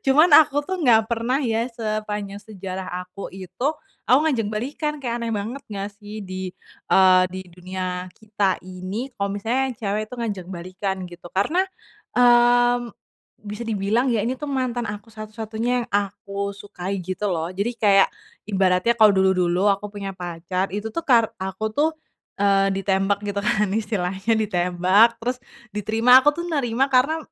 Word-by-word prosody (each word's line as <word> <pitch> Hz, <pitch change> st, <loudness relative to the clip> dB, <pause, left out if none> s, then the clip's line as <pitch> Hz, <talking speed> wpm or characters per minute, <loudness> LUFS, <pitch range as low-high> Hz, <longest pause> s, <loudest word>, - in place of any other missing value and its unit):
cuman 305 Hz, +5 st, +5 dB
aku 290 Hz, -1 st, +3 dB
tuh 375 Hz, +4 st, -4 dB
nggak 225 Hz, -5 st, +4 dB
pernah 235 Hz, +4 st, 0 dB
ya 230 Hz, -1 st, 0 dB
sepanjang 215 Hz, -3 st, -4 dB
sejarah 190 Hz, -3 st, -7 dB, 0.2 s
aku 190 Hz, +2 st, -8 dB
itu, 190 Hz, +7 st, -5 dB, 0.4 s
aku 255 Hz, -, +6 dB
ngajak 245 Hz, -9 st, +1 dB
balikan 275 Hz, +8 st, -3 dB
kayak 240 Hz, -1 st, -2 dB
aneh 230 Hz, -1 st, -2 dB
banget 225 Hz, +7 st, -4 dB
nggak 200 Hz, 0 st, -4 dB
sih 210 Hz, 0 st, -8 dB
di 185 Hz, -1 st, -6 dB, 0.4 s
eee, 185 Hz, -1 st, +6 dB
di 185 Hz, -, -5 dB
dunia 185 Hz, +1 st, -5 dB
kita 205 Hz, -3 st, -1 dB
ini 185 Hz, +8 st, -6 dB
kalau 200 Hz, 0 st, 0 dB
misalnya 225 Hz, +6 st, -1 dB
yang 245 Hz, -, -6 dB
cewek 205 Hz, +1 st, 0 dB
itu 250 Hz, -, -8 dB
ngajak 205 Hz, -6 st, -4 dB
balikan 190 Hz, +2 st, -4 dB
gitu. 175 Hz, 0 st, -12 dB
Karena, 305 Hz, -, +2 dB, 0.6 s
mmm, 240 Hz, -1 st, +4 dB, 0.5 s
bisa 210 Hz, +3 st, -6 dB
dibilang 220 Hz, +4 st, +1 dB
ya 230 Hz, -4 st, +1 dB
ini 250 Hz, +4 st, -2 dB
tuh 295 Hz, -, -5 dB
mantan 255 Hz, -4 st, -2 dB
aku 210 Hz, +2 st, -7 dB
satu-satunya 220 Hz, +2 st, -5 dB
yang -, -, -9 dB
aku 200 Hz, 0 st, -2 dB
sukai 195 Hz, -2 st, -5 dB
gitu 185 Hz, +3 st, -3 dB
loh, 170 Hz, -3 st, -1 dB
jadi 200 Hz, +6 st, -2 dB
kayak, 200 Hz, -3 st, +4 dB, 0.4 s
ibaratnya 190 Hz, +2 st, +2 dB
kalau 215 Hz, -2 st, +6 dB
dulu-dulu 190 Hz, -1 st, +2 dB
aku 200 Hz, 0 st, +1 dB
punya 200 Hz, -2 st, -6 dB
pacar 180 Hz, +1 st, -3 dB
itu 210 Hz, +2 st, -5 dB
tuh 335 Hz, -, -2 dB
kar 235 Hz, -7 st, +3 dB
aku 190 Hz, +3 st, -3 dB
tuh, 310 Hz, +2 st, +3 dB, 0.5 s
eee, 195 Hz, -1 st, +3 dB
ditembak 195 Hz, +1 st, +1 dB
gitu 200 Hz, 0 st, -2 dB
kan 210 Hz, -1 st, +2 dB
istilahnya 210 Hz, 0 st, -1 dB
ditembak, 190 Hz, +3 st, +3 dB
terus 250 Hz, +2 st, -3 dB, 0.3 s
diterima, 225 Hz, +5 st, +5 dB
aku 295 Hz, -, +5 dB
tuh 340 Hz, -, -2 dB
nerima 270 Hz, -5 st, +1 dB
karena 275 Hz, +4 st, +2 dB
210 Hz, 160 wpm, -23 LUFS, 190-235 Hz, 0.6 s, aku